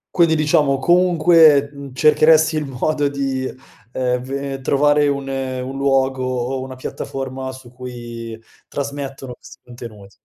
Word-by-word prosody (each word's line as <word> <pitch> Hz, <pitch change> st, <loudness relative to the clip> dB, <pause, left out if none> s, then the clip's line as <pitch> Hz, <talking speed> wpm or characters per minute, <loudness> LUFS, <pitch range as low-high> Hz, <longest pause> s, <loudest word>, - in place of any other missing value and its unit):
Quindi, 165 Hz, -2 st, +4 dB
diciamo, 150 Hz, -2 st, +2 dB
comunque, 165 Hz, -3 st, +4 dB
uhm, 140 Hz, -1 st, -9 dB
cercheresti 155 Hz, +3 st, +4 dB
il 155 Hz, -1 st, -1 dB
modo 145 Hz, +3 st, -1 dB
di, 135 Hz, -2 st, -3 dB, 0.4 s
ehm, 125 Hz, -1 st, -1 dB
ve 135 Hz, +1 st, -5 dB
trovare 145 Hz, +2 st, +3 dB
un 140 Hz, -1 st, -2 dB
un 130 Hz, -1 st, -4 dB
luogo 135 Hz, -1 st, +1 dB
o 130 Hz, +1 st, -2 dB
una 130 Hz, 0 st, -7 dB
piattaforma 130 Hz, 0 st, -6 dB
su 130 Hz, -2 st, -13 dB
cui 120 Hz, -2 st, -8 dB, 0.3 s
trasmettono 135 Hz, -2 st, -6 dB
questi -, -, -15 dB
contenuti. 115 Hz, -5 st, -11 dB
135 Hz, 130 wpm, -19 LUFS, 130-145 Hz, 0.4 s, Quindi